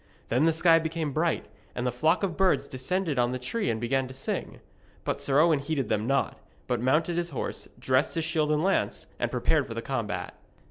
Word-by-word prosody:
Then 125 Hz, +6 st, +3 dB
the 165 Hz, -, +5 dB
sky 165 Hz, 0 st, +5 dB
became 160 Hz, -2 st, -2 dB
bright, 165 Hz, +2 st, 0 dB, 0.3 s
and 120 Hz, -, -2 dB
the 125 Hz, -, +1 dB
flock 155 Hz, -, +2 dB
of 185 Hz, -5 st, 0 dB
birds 190 Hz, -1 st, +2 dB
descended 150 Hz, +3 st, -1 dB
on 120 Hz, +1 st, +2 dB
the -, -, -1 dB
tree 200 Hz, -, -2 dB
and 110 Hz, -1 st, -1 dB
began 130 Hz, +3 st, 0 dB
to 130 Hz, -, -9 dB
sing. 135 Hz, -, -4 dB, 0.4 s
But -, -, -2 dB
Sir 140 Hz, +1 st, +3 dB
Owen 160 Hz, -2 st, +5 dB
heeded 140 Hz, -1 st, -2 dB
them 105 Hz, +2 st, 0 dB
not, 140 Hz, +1 st, 0 dB, 0.3 s
but 125 Hz, -2 st, -1 dB
mounted 155 Hz, +7 st, +2 dB
his 175 Hz, 0 st, -1 dB
horse, 135 Hz, -, -4 dB
dressed 130 Hz, +2 st, +1 dB
his 165 Hz, -1 st, 0 dB
shield 155 Hz, -2 st, +1 dB
and 150 Hz, +1 st, +2 dB
lance, 195 Hz, +1 st, 0 dB
and -, -, 0 dB
prepared -, -, +1 dB
for -, -, -6 dB
the -, -, -3 dB
combat. -, -, -3 dB
150 Hz, 215 wpm, -28 LUFS, 130-165 Hz, 0.4 s, the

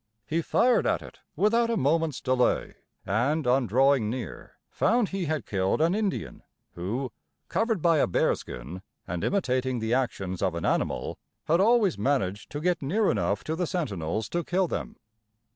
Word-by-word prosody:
He 165 Hz, +2 st, 0 dB
fired 245 Hz, +8 st, +3 dB
at -, -, 0 dB
it -, -, -13 dB, 0.2 s
without 230 Hz, +3 st, +3 dB
a 230 Hz, -, +1 dB
moment's 160 Hz, -1 st, +1 dB
delay, 130 Hz, -1 st, +1 dB, 0.3 s
and, 130 Hz, -, +1 dB
on 125 Hz, 0 st, +3 dB
drawing 130 Hz, -1 st, +3 dB
near, 115 Hz, -8 st, -6 dB
found 235 Hz, -2 st, +1 dB
he 195 Hz, -2 st, -2 dB
had 155 Hz, -7 st, -2 dB
killed 95 Hz, -2 st, 0 dB
an 165 Hz, +3 st, +3 dB
Indian, 210 Hz, -2 st, -2 dB, 0.3 s
who, 115 Hz, +9 st, -3 dB, 0.4 s
covered 225 Hz, -6 st, 0 dB
by 165 Hz, -2 st, +4 dB
a -, -, +3 dB
bearskin, 85 Hz, -2 st, -2 dB, 0.3 s
and 85 Hz, -1 st, -3 dB
imitating 130 Hz, -9 st, 0 dB
the 110 Hz, 0 st, -1 dB
actions 95 Hz, -8 st, -1 dB
of 95 Hz, -3 st, 0 dB
an 85 Hz, -, -3 dB
animal, -, -, -1 dB, 0.3 s
had 170 Hz, +4 st, +3 dB
always 215 Hz, -, +3 dB
managed 105 Hz, -5 st, 0 dB
to 145 Hz, -, -5 dB
get 180 Hz, +1 st, +1 dB
near 195 Hz, +10 st, +2 dB
enough 100 Hz, -1 st, -1 dB
to 160 Hz, -, -2 dB
the 175 Hz, 0 st, -1 dB
sentinels 110 Hz, -, -2 dB
to 175 Hz, 0 st, -1 dB
kill 185 Hz, +2 st, +1 dB
them. -, -, -4 dB
140 Hz, 165 wpm, -27 LUFS, -, 0.4 s, by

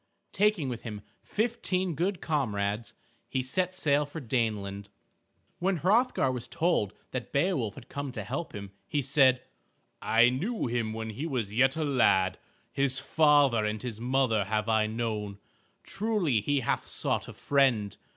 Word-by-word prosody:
Taking 205 Hz, -8 st, +2 dB
with 120 Hz, -2 st, -4 dB
him 105 Hz, -3 st, -7 dB, 0.2 s
fifteen 200 Hz, -5 st, -1 dB
good 180 Hz, +5 st, -1 dB
comrades, 105 Hz, -8 st, -1 dB, 0.3 s
he 130 Hz, -, -1 dB
set 185 Hz, +8 st, -1 dB
sail 150 Hz, -4 st, +2 dB
for 145 Hz, +3 st, -7 dB
Daneland. 105 Hz, -6 st, -2 dB, 0.7 s
When 190 Hz, +1 st, +1 dB
Hrothgar 200 Hz, -, +2 dB
was 125 Hz, -2 st, -5 dB
told 165 Hz, -, 0 dB, 0.2 s
that 130 Hz, -2 st, -5 dB
Beowulf 140 Hz, -, 0 dB
had -, -, -12 dB
come 140 Hz, -1 st, -5 dB
to -, -, -4 dB
help 170 Hz, -, -5 dB
him, 100 Hz, -1 st, -7 dB, 0.2 s
he 145 Hz, -1 st, -1 dB
said, 130 Hz, -1 st, +4 dB, 0.6 s
"I 115 Hz, +2 st, +5 dB
knew 195 Hz, -, -2 dB
him 115 Hz, -2 st, -1 dB
when 110 Hz, 0 st, -4 dB
he 140 Hz, +10 st, -4 dB
was 120 Hz, -9 st, -2 dB
yet 135 Hz, +6 st, +3 dB
a 160 Hz, -, 0 dB
lad. 95 Hz, -10 st, +3 dB, 0.3 s
His 135 Hz, -1 st, +1 dB
father 140 Hz, -5 st, +4 dB
and 105 Hz, 0 st, -1 dB
his 115 Hz, -3 st, -5 dB
mother 125 Hz, -4 st, +1 dB
have 105 Hz, +1 st, -1 dB
I 110 Hz, -1 st, +2 dB
known. 110 Hz, -3 st, -3 dB, 0.5 s
Truly 195 Hz, -, 0 dB
he 145 Hz, +5 st, +1 dB
hath -, -, -1 dB
sought -, -, -2 dB
a -, -, -8 dB
friend. 125 Hz, -8 st, +1 dB
130 Hz, 155 wpm, -29 LUFS, 110-155 Hz, 0.7 s, I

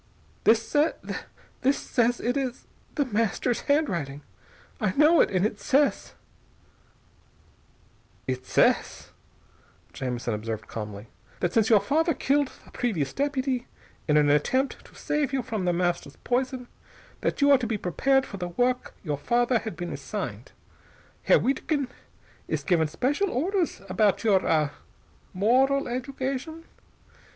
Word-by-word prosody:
"This 225 Hz, +5 st, +3 dB, 0.9 s
this 275 Hz, +2 st, +3 dB
says.... 240 Hz, 0 st, +1 dB
It 245 Hz, +2 st, -1 dB
is 260 Hz, -3 st, -3 dB, 0.3 s
The 285 Hz, -, +1 dB
Master's 230 Hz, +1 st, 0 dB
handwriting! 170 Hz, -, 0 dB, 0.6 s
I 210 Hz, -6 st, 0 dB
know 305 Hz, +5 st, +6 dB
it! -, -, +3 dB
And 185 Hz, 0 st, +1 dB
it 210 Hz, -1 st, -2 dB
says 280 Hz, +6 st, +1 dB, 1.0 s
" -, -, -34 dB
"It 130 Hz, 0 st, -2 dB
says," -, -, +1 dB, 0.8 s
Jamison 125 Hz, -3 st, -3 dB
observed 110 Hz, +1 st, -4 dB
calmly, 105 Hz, -1 st, -6 dB, 0.3 s
"that 175 Hz, -1 st, -1 dB
since 220 Hz, -1 st, +3 dB
your 220 Hz, -3 st, +7 dB
father 320 Hz, -, +1 dB
killed 280 Hz, 0 st, +1 dB
the -, -, -17 dB
previous 175 Hz, -, -1 dB
deputy 265 Hz, -3 st, -1 dB, 0.4 s
in 150 Hz, -1 st, +4 dB
an 145 Hz, -1 st, +4 dB
attempt 260 Hz, -, +1 dB
to -, -, -18 dB
save 295 Hz, -3 st, -1 dB
you 265 Hz, -2 st, 0 dB
from 220 Hz, -6 st, -3 dB
The 175 Hz, -, +3 dB
Master's 175 Hz, -5 st, -1 dB
poison, 255 Hz, 0 st, -1 dB, 0.5 s
that -, -, -1 dB
you 285 Hz, -1 st, +5 dB
are 275 Hz, -, +7 dB
to 240 Hz, -, -2 dB
be 220 Hz, -1 st, -1 dB
prepared 265 Hz, -, +1 dB
for 200 Hz, -, -8 dB
the 180 Hz, -1 st, -3 dB
work 245 Hz, +8 st, -1 dB
your 150 Hz, -5 st, -2 dB
father 240 Hz, -, +2 dB
had 220 Hz, -1 st, -6 dB
been 175 Hz, -1 st, -5 dB
assigned. -, -, -5 dB, 0.7 s
Herr -, -, +6 dB
Wiedkind 275 Hz, 0 st, 0 dB, 0.6 s
is -, -, -2 dB
given 165 Hz, -4 st, +2 dB
special 285 Hz, -, 0 dB
orders 350 Hz, -, -1 dB
about 200 Hz, +3 st, +2 dB
your 200 Hz, -4 st, +4 dB
ah 155 Hz, -3 st, +2 dB, 0.6 s
moral 260 Hz, +8 st, +3 dB
education. 270 Hz, +5 st, -4 dB
240 Hz, 140 wpm, -26 LUFS, 175-275 Hz, 1.0 s, your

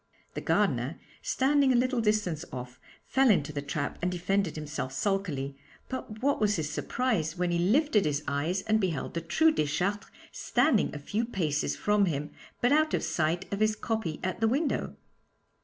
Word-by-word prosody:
The -, -, -4 dB
gardener, -, -, +1 dB, 0.2 s
standing 280 Hz, -, +3 dB
a -, -, +3 dB
little 250 Hz, 0 st, +2 dB
distance 210 Hz, -7 st, 0 dB
off, 125 Hz, 0 st, -7 dB, 0.3 s
fell 265 Hz, -1 st, +3 dB
into 150 Hz, -7 st, +2 dB
the 145 Hz, -, -2 dB
trap 140 Hz, 0 st, -3 dB
and 180 Hz, +1 st, 0 dB
defended 180 Hz, 0 st, 0 dB
himself 150 Hz, -4 st, -4 dB
sulkily, 150 Hz, -7 st, -1 dB, 0.3 s
but 220 Hz, -3 st, -6 dB
what 280 Hz, -4 st, +2 dB
was 210 Hz, -1 st, +3 dB
his 155 Hz, -2 st, -2 dB
surprise 185 Hz, -4 st, -1 dB
when 175 Hz, 0 st, 0 dB
he 170 Hz, -, +1 dB
lifted 215 Hz, -, +3 dB
his 150 Hz, 0 st, 0 dB
eyes 160 Hz, +7 st, -1 dB
and 220 Hz, 0 st, +2 dB
beheld 170 Hz, -7 st, -2 dB
the 170 Hz, -, -2 dB
true 320 Hz, -, +3 dB
Deschartres 185 Hz, -, -1 dB, 0.2 s
standing 255 Hz, -9 st, +2 dB
a -, -, -3 dB
few 205 Hz, +10 st, -2 dB
paces 160 Hz, -10 st, -1 dB
from 210 Hz, -1 st, +2 dB
him, 150 Hz, -4 st, -2 dB, 0.3 s
but 245 Hz, -, +3 dB
out 310 Hz, +1 st, +3 dB
of -, -, -2 dB
sight 160 Hz, +3 st, 0 dB
of 200 Hz, -, -2 dB
his 215 Hz, 0 st, +2 dB
copy 215 Hz, -9 st, -3 dB
at 185 Hz, 0 st, -2 dB
the 225 Hz, -, +4 dB
window? 280 Hz, +6 st, 0 dB
195 Hz, 175 wpm, -29 LUFS, 155-225 Hz, 0.3 s, the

